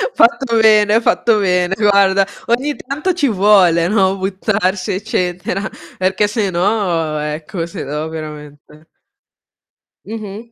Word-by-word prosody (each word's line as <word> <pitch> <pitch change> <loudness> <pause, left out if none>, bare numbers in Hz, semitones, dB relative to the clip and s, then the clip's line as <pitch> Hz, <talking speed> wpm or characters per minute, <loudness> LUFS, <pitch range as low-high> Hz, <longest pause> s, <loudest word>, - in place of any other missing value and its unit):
Fatto 235 0 +2
bene, 215 0 +4
fatto 225 -1 +2
bene, 180 -1 +1
guarda. 200 -2 +3 0.2
Ogni 265 +5 0
tanto 305 +7 -3
ci 295 -5 0
vuole, 190 -5 +3
no, 195 -1 +1
buttarsi 190 0 -1
eccetera, 185 0 -3 0.3
perché 190 +3 +1
sennò 185 -6 -1
ecco, 155 +4 -4
sennò 155 -3 -5
veramente 150 0 -10 1.2
Mh-mh. 220 +1 -8
195 Hz, 105 wpm, -16 LUFS, 175-215 Hz, 1.2 s, bene